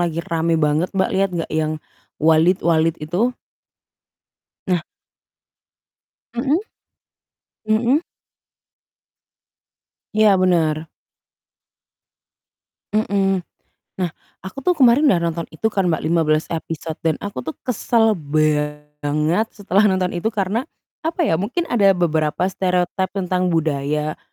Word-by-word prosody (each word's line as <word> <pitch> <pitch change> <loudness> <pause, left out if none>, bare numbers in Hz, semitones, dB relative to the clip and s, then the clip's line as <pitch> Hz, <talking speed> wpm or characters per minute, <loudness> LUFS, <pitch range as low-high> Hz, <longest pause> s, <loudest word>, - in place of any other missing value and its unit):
lagi 170 -1 -1
rame 165 0 0
banget, 155 +3 +1
Mbak, 190 - +2
lihat 195 +1 +2
enggak 165 - -3
yang 155 0 0 0.4
Walid-Walid 165 0 +3
itu? 210 +11 0 1.3
Nah. 180 -3 +1 1.6
Mhm. 280 +6 +2 1.1
Mhm. 235 +7 +2 2.1
Iya, 215 -2 +5
bener. 160 -4 +1 2.0
Mhm. 195 -3 +1 0.6
Nah 175 - 0 0.3
aku 190 +8 -9
tuh 360 - +4
kemarin 265 +2 +5
udah 190 - +4
nonton 170 0 -2
itu 190 - -2
kan, 195 -2 +1
Mbak, 160 - 0
15 155 -1 +2
episode 160 -1 -5
dan 160 - +3
aku 200 -8 -5
tuh 155 +5 -6
kesel 230 -2 +2
banget 150 +3 0
setelah 205 0 +2
nonton 185 -2 +1
itu 175 +5 -1
karena, 215 +4 -1 0.4
apa 335 +2 0
ya, 160 - +2
mungkin 250 - -1
ada 200 -5 +4
beberapa 160 -1 +1
stereotype 185 0 -1
tentang 185 -1 0
budaya, 150 -2 -1
175 Hz, 105 wpm, -20 LUFS, 155-205 Hz, 2.1 s, Iya